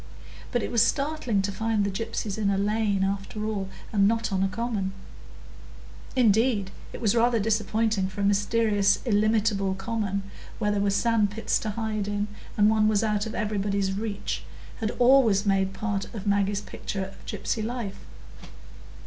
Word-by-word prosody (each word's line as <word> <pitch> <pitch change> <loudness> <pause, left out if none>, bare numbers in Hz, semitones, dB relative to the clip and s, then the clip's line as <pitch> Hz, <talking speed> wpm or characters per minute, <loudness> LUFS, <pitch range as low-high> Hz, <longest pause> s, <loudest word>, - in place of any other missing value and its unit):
But 240 -3 0
it - - -3
was 235 - +3
startling 275 -7 +1
to 200 - -1
find 220 +1 0
the 200 - -1
gypsies 220 0 -3
in 205 -2 +1
a 195 - +1
lane, 205 -1 +1
after 200 +2 -2
all, 200 -3 -2 0.2
and 200 -2 +4
not 225 0 0
on 190 -1 0
a 195 - +3
common; 205 -2 -2 1.2
indeed, 220 -4 +3 0.2
it - - -8
was 215 -4 +2
rather 235 0 +3
disappointing; 215 -1 +1
for 195 +2 -6
a - - 0
mysterious 205 0 +3
illimitable 210 -3 +2
common, 200 -1 -2 0.3
where 210 -2 0
there 205 -1 0
were 200 - +2
sand 215 +1 +2
pits 225 +3 -1
to 215 - -3
hide 215 -1 -2
in, 205 0 -2 0.3
and 205 0 +5
one 215 -1 +3
was 215 0 +2
out 210 0 0
of 220 - -6
everybody's 200 -2 -1
reach, 205 0 -3 0.4
had 220 -2 -1
always 240 -5 +5
made 195 -1 +2
part 195 0 -3
of 205 -2 -6
Maggie's 200 0 +1
picture 195 -2 -5
of 195 - -13
gypsy 220 - -2
life. 230 -3 -4
210 Hz, 165 wpm, -26 LUFS, 200-225 Hz, 1.2 s, and